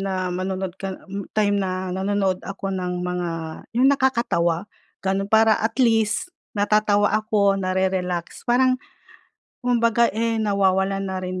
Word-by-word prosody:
na 185 -2 -2
manonood 185 0 -3
ka 195 -1 -4 0.2
m 200 -1 -5
time 205 -1 +2
na 185 0 -2
nanonood 190 0 0
ako 195 0 -4
ng 180 -1 -3
mga 180 -1 -2 0.5
'yong 255 +2 +5
nakakatawa, 230 -11 +1 0.4
gano'n. 195 +1 0
Para 220 0 +5
at 220 +1 -1
least, 225 - +2 0.3
natatawa 205 0 +3
ako, 205 -2 +2
na 185 0 -1
rerelax. 180 -2 -1
Parang, 255 +1 +3 0.9
kumbaga, 235 -1 +3
eh, 230 +1 0
nawawalan 195 -2 +1
na 190 0 -3
rin 185 0 -4
195 Hz, 135 wpm, -23 LUFS, 185-220 Hz, 0.9 s, yong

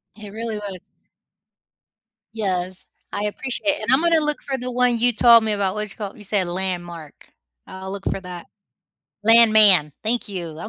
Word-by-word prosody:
It 210 -1 -11
really 225 +1 -5
was. 200 -3 -7 1.5
Yes, 185 -4 -4 0.3
I 205 - -4
appreciate 255 +7 -4
it, - - -10
and 215 +3 0
I'm 265 +3 +4
gonna 335 -2 +3
look 300 0 -2
for 270 -2 -3
the 250 0 -6
one 250 -1 +1
you 245 +1 +3
told 230 0 +6
me 220 - -1
about. 200 -1 -1
What's 210 -1 -5
it - - -24
called? 205 -1 -7
You 210 - -13
said 195 -2 0
Landmark. 175 -4 -6 0.4
I'll 190 0 -9
look 195 0 -8
for - - -3
that. 180 -2 -9 0.8
Landman. 215 -8 +6
Thank 230 0 -2
you. 180 -4 -6
I'm 215 - -7
210 Hz, 180 wpm, -21 LUFS, 185-235 Hz, 1.5 s, told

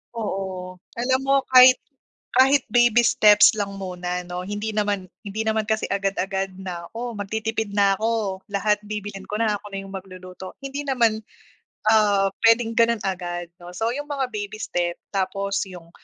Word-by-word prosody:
Oo 190 -4 -4 0.2
alam 255 +2 +1
mo 275 0 +3 0.2
kahit 255 0 +9 0.6
kahit 270 +2 +6
baby 240 +1 +5
steps 210 -2 +6
lang 200 -1 -3
muna 180 -1 -4
'no, 180 +1 -6
hindi 205 +2 -3
naman 205 -3 -1 0.2
hindi 205 +2 -3
naman 220 -1 0
kasi 220 0 -1
agad-agad 195 -1 -1
na 175 -2 -6
"O, 235 -1 -5
magtitipid 220 +1 -3
na 200 -1 +3
ako, 220 -4 -1
lahat 210 +1 +1
bibilhin 205 -2 -6
ko 210 - -5
na, 215 -2 +1
ako 205 0 -13
na 195 - -3
yung 195 - -11
magluluto." 185 0 -9
Hindi 280 +1 -5
naman, 235 -5 +2 0.7
ah 205 -3 +4 0.2
pwedeng 230 0 +4
ganon 230 -2 +3
agad 175 -2 -3
'no, 175 0 -11
so 225 +6 -1
yung 290 +3 -4
mga 275 -3 -2
baby 215 -1 -6
step 175 -1 -1 0.2
tapos 200 +1 -1
yung, 180 -3 -12
205 Hz, 160 wpm, -23 LUFS, 190-225 Hz, 0.7 s, kahit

